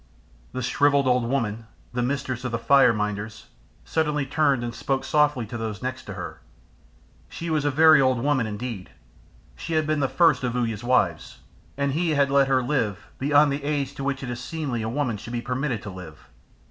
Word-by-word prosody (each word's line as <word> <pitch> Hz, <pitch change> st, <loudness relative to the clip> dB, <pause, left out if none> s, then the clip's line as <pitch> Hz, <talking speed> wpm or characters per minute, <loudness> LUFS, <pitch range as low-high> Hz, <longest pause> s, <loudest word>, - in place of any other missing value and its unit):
The 130 Hz, -, -4 dB
shrivelled 140 Hz, +2 st, +3 dB
old 125 Hz, -1 st, +2 dB
woman, 115 Hz, -4 st, -2 dB, 0.3 s
the 125 Hz, -, -1 dB
mistress 130 Hz, -1 st, -2 dB
of 125 Hz, -, -3 dB
the 115 Hz, -, 0 dB
fire 135 Hz, 0 st, +5 dB
minders, 105 Hz, 0 st, -4 dB, 0.4 s
suddenly 150 Hz, -3 st, 0 dB
turned 140 Hz, -3 st, +1 dB
and 120 Hz, -1 st, -4 dB
spoke 135 Hz, +2 st, -2 dB
softly 145 Hz, -5 st, +2 dB
to 115 Hz, +2 st, -6 dB
those 110 Hz, -3 st, -5 dB
next -, -, -4 dB
to -, -, -7 dB
her. -, -, -7 dB, 0.9 s
She 170 Hz, 0 st, -5 dB
was 150 Hz, -2 st, 0 dB
a -, -, +3 dB
very 155 Hz, 0 st, +6 dB
old 130 Hz, -1 st, +3 dB
woman 130 Hz, -2 st, +1 dB
indeed, 105 Hz, -2 st, -6 dB, 0.7 s
she 165 Hz, -, -6 dB
had 155 Hz, -1 st, +2 dB
been 155 Hz, 0 st, 0 dB
the 135 Hz, -2 st, +1 dB
first 165 Hz, -7 st, +3 dB
of 125 Hz, -1 st, -1 dB
Uya's 115 Hz, -3 st, -2 dB
wives, 85 Hz, -, 0 dB, 0.4 s
and 140 Hz, 0 st, 0 dB
he 160 Hz, +2 st, 0 dB
had 140 Hz, -1 st, +2 dB
let 140 Hz, -1 st, +4 dB
her 130 Hz, -2 st, +2 dB
live 120 Hz, -7 st, -2 dB
beyond 145 Hz, +1 st, +4 dB
the 140 Hz, +1 st, -3 dB
age 140 Hz, -2 st, -1 dB
to 140 Hz, -, -6 dB
which 140 Hz, 0 st, -2 dB
it 125 Hz, -, -4 dB
is 120 Hz, -, -5 dB
seemly 140 Hz, -5 st, -3 dB
a 110 Hz, -, -2 dB
woman 125 Hz, -3 st, -1 dB
should 115 Hz, +4 st, -9 dB
be 120 Hz, -, -1 dB
permitted 125 Hz, -1 st, -2 dB
to 100 Hz, -, -6 dB
live. 85 Hz, -5 st, -11 dB
130 Hz, 200 wpm, -24 LUFS, 115-145 Hz, 0.9 s, very